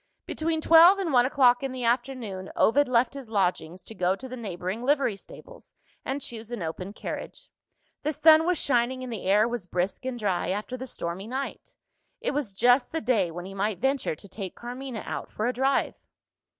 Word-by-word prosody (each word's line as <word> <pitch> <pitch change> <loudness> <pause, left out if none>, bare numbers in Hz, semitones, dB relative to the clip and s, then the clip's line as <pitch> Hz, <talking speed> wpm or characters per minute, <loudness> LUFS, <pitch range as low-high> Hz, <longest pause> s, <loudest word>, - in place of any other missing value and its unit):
Between 320 0 -2
twelve 335 +5 +8
and 360 -7 -2
one 245 0 +5
o'clock 255 -3 +4
in 270 -1 -3
the 255 -1 -5
afternoon, 235 -6 -2
Ovid 285 +5 +4
left 240 0 +2
his 275 -5 -8
Lodgings, 185 -4 -1
to - - -10
go 185 -2 +1
to 260 +6 -9
the 255 - -7
neighbouring 195 -2 -5
livery 270 -4 +1
stables, - - -14 0.3
and 275 +2 -3
choose 230 -3 -7
an 240 -7 -4
open 180 +4 -5
carriage. 210 - -7 0.5
The 305 - -1
sun 315 +2 +6
was 360 -1 +2
shining, 255 -1 +1
and 250 -2 -5
the 215 - -6
air 210 +3 +4
was 235 -6 -4
brisk 180 +5 -2
and 260 -2 -3
dry, 195 -6 -1
after 210 +6 -3
the 260 +1 -7
stormy 180 -2 -5
night. 265 +3 -5 0.4
It - - -1
was 280 -7 -2
just 245 +6 +3
the 325 - -1
day 220 -7 +1
when 175 +2 -7
he 195 - -8
might 200 0 -1
venture 265 - 0
to 200 - -14
take 190 -1 -7
Carmina 245 -1 -6
out - - -5
for 215 - -3
a 250 - +1
drive. 265 +2 +1
240 Hz, 200 wpm, -27 LUFS, 195-270 Hz, 0.5 s, twelve